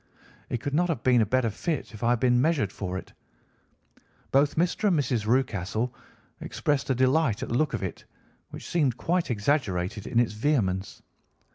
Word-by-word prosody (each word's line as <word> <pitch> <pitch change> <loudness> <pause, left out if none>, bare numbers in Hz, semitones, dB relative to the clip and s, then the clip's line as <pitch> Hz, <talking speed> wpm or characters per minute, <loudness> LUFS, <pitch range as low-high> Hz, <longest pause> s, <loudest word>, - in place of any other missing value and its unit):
It 120 - -3
could 140 +2 -3
not 175 +4 +2
have 150 -8 -2
been 125 -2 +4
a 110 - +1
better 125 0 +1
fit 150 - -3
if 110 - -10
I 115 - +3
had 120 -1 +2
been 125 0 +3
measured 140 - +1
for 95 -2 -4
it. - - -9 1.2
Both 140 +2 +3
Mr. 180 +5 +1
and 180 -5 +3
Mrs. 120 -6 0
Rucastle 115 -1 0 0.5
expressed 145 -2 -1
a 130 - +2
delight 130 -2 +2
at - - -5
the - - -1
look 155 -1 +1
of - - -4
it, - - -5 0.4
which - - -9
seemed 140 -8 +1
quite 175 +3 0
exaggerated 105 -5 -1
in 115 - +2
its 120 -3 +1
vehemence. 105 -6 -1
125 Hz, 180 wpm, -27 LUFS, 110-145 Hz, 1.2 s, been